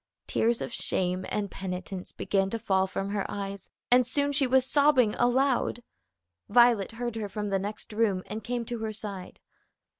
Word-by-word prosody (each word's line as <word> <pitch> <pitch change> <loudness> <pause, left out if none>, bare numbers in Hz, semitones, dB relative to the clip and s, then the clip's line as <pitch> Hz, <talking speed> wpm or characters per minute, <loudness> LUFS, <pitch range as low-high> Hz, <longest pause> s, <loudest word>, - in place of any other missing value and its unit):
Tears 230 +1 +1
of - - -6
shame 185 0 0
and 205 -2 -2
penitence 185 0 -6
began 195 -1 0
to 230 - -2
fall 190 -3 +1
from 195 +1 -3
her 205 -1 -1
eyes, 200 -1 -5 0.2
and 250 +1 +7
soon 285 +2 0
she 280 -2 +2
was 260 0 +4
sobbing 275 -6 +4
aloud. 245 -1 +1 0.7
Violet 235 -2 +4
heard 240 0 -4
her 210 -2 -3
from 210 0 -3
the 195 -1 +1
next 210 +2 -6
room, 210 -4 +1
and 215 0 -6
came 240 +1 -3
to 240 0 -4
her 220 -1 -3
side. 200 -3 -7
215 Hz, 175 wpm, -28 LUFS, 195-245 Hz, 0.7 s, and